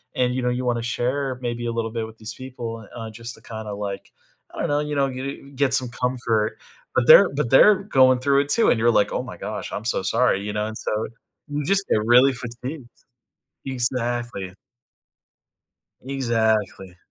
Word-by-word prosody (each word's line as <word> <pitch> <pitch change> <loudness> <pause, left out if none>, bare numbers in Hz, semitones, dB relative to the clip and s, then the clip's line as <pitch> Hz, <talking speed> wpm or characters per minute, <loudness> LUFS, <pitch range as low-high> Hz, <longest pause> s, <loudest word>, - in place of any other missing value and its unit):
and 125 -1 +1
you 130 - -1
know, 125 - 0
you 125 +1 -2
wanna 120 -1 0
share 125 +3 -1
maybe 120 -1 -3
a - - -1
little 115 -1 -2
bit 110 -1 -3
with 110 0 -14
these 110 0 -6
people, 115 -4 -7
uh, 115 -1 -6
just 115 +2 -8
to - - -19
kinda 110 -2 -6
like, 100 -1 -6 0.4
I - - -7
don't - - -1
know, 145 0 +2
you 150 0 -3
know, 135 -1 +1
g 140 +2 -6
get 135 0 +2
some 125 -2 -1
comfort, 120 -3 -1 0.4
but 125 - +3
they're 190 +4 +9
but 145 -5 -1
they're 210 +10 +8
going 130 -9 +4
through 140 +2 +3
it 145 - -5
too, 230 +8 +3
and 115 - +3
you're 120 - +4
like, 105 - +2
"Oh - - 0
my - - -9
gosh, - - -5
I'm 105 - -5
so 115 - 0
sorry," 100 0 +2
you 105 - -3
know, 105 0 -1
and 110 - -6
so 110 +1 -2 0.4
you 145 0 -2
just 195 +1 +2
get - - +3
really 125 +4 +6
fatigued. 125 +2 -7 0.8
Exactly. 120 -6 -2 1.5
Exactly. 110 -8 -1
120 Hz, 195 wpm, -23 LUFS, 110-130 Hz, 1.5 s, they're